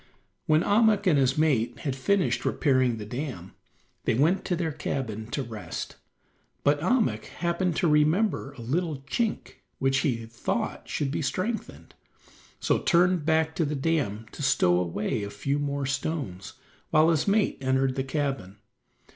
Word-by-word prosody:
When 155 +2 +4
Ahmuk 215 0 +3
and 160 -7 +4
his 135 +1 +2
mate 140 -7 +2
had 135 -3 -2
finished 185 +8 +1
repairing 130 -5 +2
the 105 - -6
dam, 120 - -6 0.5
they - - +2
went 160 +10 +2
to 180 - 0
their 165 -2 -1
cabin 120 -7 -4
to 135 +4 -3
rest, 110 -3 -6 0.7
but 145 +1 +3
Ahmuk 230 +6 +1
happened 170 0 -1
to 175 - +2
remember 155 +1 +2
a 135 - -11
little 150 +4 -2
chink 215 - -2 0.2
which 135 0 +2
he 120 -5 -1
thought 115 +1 -3
should 140 -2 -1
be - - -2
strengthened, 210 - -3 0.7
so - - +1
turned 180 -3 +3
back 160 0 +2
to 170 - +2
the 150 0 -1
dam 135 -8 -1
to - - -9
stow 90 -10 +3
away 95 +5 -2
a 100 - -4
few 140 +7 -2
more 140 -1 -2
stones, 135 - -3 0.4
while 155 +1 +5
his 155 +1 +1
mate 205 +1 +2
entered 130 0 +1
the 135 0 -2
cabin. 135 -8 -3
145 Hz, 155 wpm, -27 LUFS, 130-165 Hz, 0.7 s, while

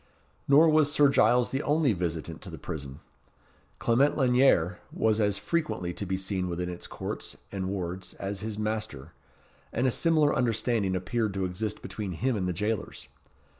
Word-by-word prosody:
Nor 145 +4 +7
was 155 -2 +4
Sir 145 -1 +5
Giles 120 -1 +3
the 135 - -1
only 150 -5 +2
visitant 85 -4 -4
to - - -8
the - - -8
prison. 70 -3 -7 0.8
Clement 135 +5 +2
Lanyere 125 - +3
was 110 0 +1
as 100 -1 +2
frequently 125 - -2
to 100 - -5
be 95 +1 -1
seen 95 -1 -2
within 90 +1 -3
its 90 0 -6
courts - - -6
and 95 -2 -3
wards 95 -1 -5
as 95 0 -4
his 110 0 -4
master, 105 -9 -4 0.6
and 120 - 0
a 130 - +3
similar 155 +1 +3
understanding 115 -5 +1
appeared 105 +3 -1
to 95 -1 0
exist 105 +4 -4
between 100 -4 -5
him 125 +9 0
and 95 -3 -1
the - - 0
jailers. 105 +4 -3
105 Hz, 170 wpm, -28 LUFS, 90-125 Hz, 0.8 s, Nor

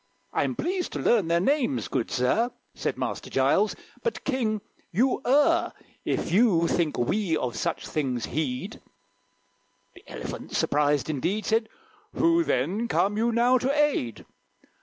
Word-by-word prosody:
"I'm - - 0
pleased 360 +1 -2
to - - -3
learn 215 -8 +3
their 170 +1 +3
names, 215 - +1
good 115 - -2
sir," 130 - +1 0.2
Said - - -3
Master - - -4
Giles; - - +2 0.3
"but, 470 - -3
King, 230 -6 -1 0.3
you 250 +8 +2
err 295 +6 +3 0.3
If - - -2
you 180 -4 +4
think 165 -4 0
we 165 - +1
of 125 -4 -3
such 170 - -2
things 130 -6 -2
heed." 130 -3 -3 1.1
The - - -16
Elephant, - - -6
surprised 145 -1 +2
indeed, 170 +8 -1
Said, 220 0 +1 0.5
"Who, 335 0 +3
then, 190 - 0
come 205 -3 +1
you 230 +2 +1
now 245 +2 +4
to 260 +3 0
aid?" 290 - 0
210 Hz, 140 wpm, -26 LUFS, 150-255 Hz, 1.1 s, you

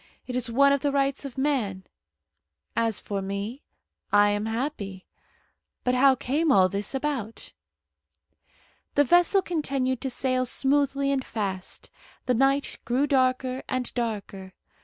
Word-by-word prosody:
It 250 - -5
is 250 -2 -1
one 280 +4 +4
of 280 - +1
the 285 +1 0
rights 275 0 0
of 270 -2 -8
man. 250 -10 -1 0.9
As 225 -2 +1
for 200 -1 -4
me, 200 +7 -4 0.5
I 205 0 +5
am 205 +1 -1
happy. 225 -6 -4 0.8
But 250 - +1
how 265 +1 +5
came 280 +4 0
all 185 -6 +5
this 200 +6 -3
about?" 265 -6 -4 1.4
The 290 - +5
vessel 350 +6 +4
continued 275 -7 -1
to 265 - -2
sail 255 0 0
smoothly 275 +1 +1
and 270 -2 0
fast. 195 -6 -5 0.3
The 250 - +2
night 270 +3 +1
grew 250 +4 +1
darker 255 -1 +1
and 255 -1 -2
darker. 205 -5 -4
255 Hz, 135 wpm, -26 LUFS, 215-275 Hz, 1.4 s, I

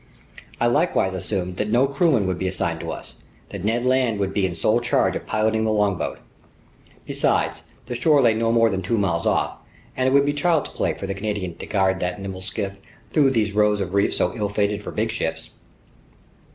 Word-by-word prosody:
I 120 - +2
likewise 120 - +2
assumed 90 -1 -3
that 105 - -1
no 120 +4 +4
crewmen 140 - +2
would 95 -1 -2
be 95 - -1
assigned 85 -3 -2
to - - -6
us, - - -8 0.3
that - - -7
Ned 115 +4 0
Land 125 -4 +2
would 95 -1 -1
be 100 -2 +1
in 90 - -5
sole 110 +8 +2
charge 120 - +1
of - - -5
piloting 110 +1 +1
the 110 - +1
longboat. 105 -4 0 0.9
Besides, - - 0 0.2
the 125 - -5
shore 145 +5 +3
lay 115 -2 +5
no 115 +1 +1
more 115 -1 +4
than 95 -1 -2
two 100 +5 -1
miles 85 -5 0
off, - - 0 0.4
and 130 0 +1
it - - +3
would 140 +1 +5
be 145 - +1
child's 155 +1 +1
play - - -1
for - - -6
the 95 - -2
Canadian 100 -3 -3
to - - -8
guide 95 -2 +1
that 90 +1 -2
nimble 95 -1 -6
skiff 100 0 -4 0.3
through 145 -3 +5
those 110 -5 +1
rows 105 0 +2
of 95 -2 -3
reefs 100 0 +2
so 90 - +1
ill 105 -3 -1
fated 100 0 0
for - - -7
big 110 +1 -1
ships. 80 -7 -4
105 Hz, 210 wpm, -23 LUFS, 95-120 Hz, 0.9 s, lay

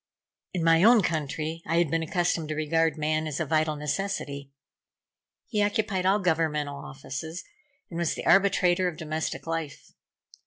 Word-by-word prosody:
In 175 - 0
my 165 0 +5
own 225 +1 +6
country 155 0 -2
I 165 - +1
had 170 -4 +2
been 165 - +1
accustomed 165 -1 -1
to 155 - -2
regard 160 +1 +1
man 155 +1 0
as 150 -3 -3
a 160 - 0
vital 155 0 +1
necessity. 145 -3 -3 1.0
He 210 -3 0
occupied 205 -2 0
all 195 +2 +4
governmental 160 -6 0
offices, 145 +5 -7 0.5
and 170 - -4
was 170 -2 0
the - - -6
arbitrator 185 -1 +4
of 170 -3 -4
domestic 155 -1 -4
life. 165 -3 -5
165 Hz, 155 wpm, -27 LUFS, 155-180 Hz, 1.0 s, own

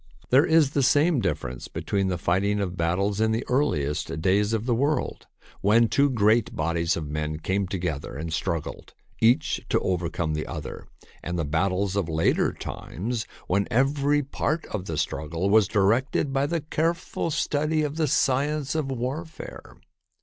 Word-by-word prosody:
There 135 +6 +6
is 160 -4 +4
the 140 - +1
same 145 +4 +4
difference 75 - -3
between 100 -1 -1
the 90 -1 -1
fight 90 +3 +1
ing 105 0 +1
of 95 -3 -2
battles 95 +5 0
in 110 0 +3
the 115 +2 -1
earliest 75 - 0
days 100 +5 +2
of 110 0 -1
the 125 - +1
world, 140 +6 -1 0.3
when 115 +4 +4
two 140 +5 +3
great 110 -2 +2
bodies 85 +1 0
of 80 -3 -4
men 75 +1 -3
came 95 +4 -1
together 90 -8 -3
and 80 +2 -4
struggled, 85 -3 -3 0.3
each 120 +7 +3
to - - +3
overcome 85 -3 -1
the 75 0 -3
other, 75 -5 -7 0.3
and 90 +1 -4
the 80 - -1
battles 95 +5 0
of 95 -5 0
later 80 0 +2
times, 110 +3 -5 0.2
when 100 +2 +1
every 140 +4 +2
part 150 +3 -2
of 95 -3 -3
the 80 - -4
strug 75 +1 -2
gle 85 +5 -1
was 110 -2 +5
directed 115 +8 +1
by 135 +1 +1
the 165 +1 -1
careful 165 +3 -1
study 155 +1 0
of 150 +1 -3
the 160 -2 +2
science 140 +1 +1
of 155 -4 -1
warfare. 135 +6 -6
105 Hz, 170 wpm, -25 LUFS, 85-140 Hz, 0.3 s, There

